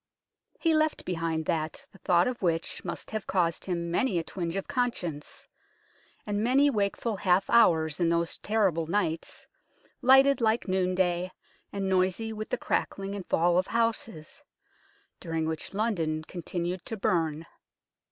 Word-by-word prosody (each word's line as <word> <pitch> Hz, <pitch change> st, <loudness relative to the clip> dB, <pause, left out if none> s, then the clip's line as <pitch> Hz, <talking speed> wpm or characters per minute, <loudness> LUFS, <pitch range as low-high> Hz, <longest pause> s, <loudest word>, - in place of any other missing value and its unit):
He 330 Hz, -1 st, +2 dB
left 310 Hz, 0 st, +1 dB
behind 165 Hz, -2 st, -2 dB
that 155 Hz, 0 st, -2 dB
the 195 Hz, -, -18 dB
thought 175 Hz, -1 st, +3 dB
of 250 Hz, -1 st, -3 dB
which 165 Hz, -3 st, -1 dB
must -, -, -6 dB
have 215 Hz, -2 st, -4 dB
caused 170 Hz, -3 st, 0 dB
him 170 Hz, -2 st, -2 dB
many 190 Hz, +2 st, +1 dB
a 165 Hz, -, 0 dB
twinge 170 Hz, 0 st, -4 dB
of 195 Hz, -, -3 dB
conscience, 235 Hz, -, -3 dB, 0.8 s
and 205 Hz, 0 st, -1 dB
many 275 Hz, +4 st, +4 dB
wakeful 210 Hz, 0 st, -1 dB
half 185 Hz, 0 st, +2 dB
hours 160 Hz, -9 st, +4 dB
in 170 Hz, -2 st, +2 dB
those 170 Hz, 0 st, 0 dB
terrible 195 Hz, -7 st, +1 dB
nights, 170 Hz, -3 st, -2 dB, 0.6 s
lighted 270 Hz, +1 st, +6 dB
like 220 Hz, 0 st, +1 dB
noon 185 Hz, -1 st, +1 dB
day 180 Hz, -1 st, +1 dB, 0.4 s
and 200 Hz, -1 st, -2 dB
noisy 190 Hz, +4 st, +1 dB
with 215 Hz, 0 st, -6 dB
the -, -, 0 dB
crackling 195 Hz, 0 st, -2 dB
and 200 Hz, -3 st, -6 dB
fall 175 Hz, +2 st, +3 dB
of 185 Hz, -, -1 dB
houses, 230 Hz, -, -2 dB, 0.8 s
during 165 Hz, -2 st, -2 dB
which 160 Hz, 0 st, -4 dB
London 170 Hz, -8 st, -1 dB
continued 175 Hz, +1 st, -4 dB
to 225 Hz, -, -4 dB
burn. 165 Hz, -4 st, 0 dB
185 Hz, 150 wpm, -28 LUFS, 170-220 Hz, 0.8 s, lighted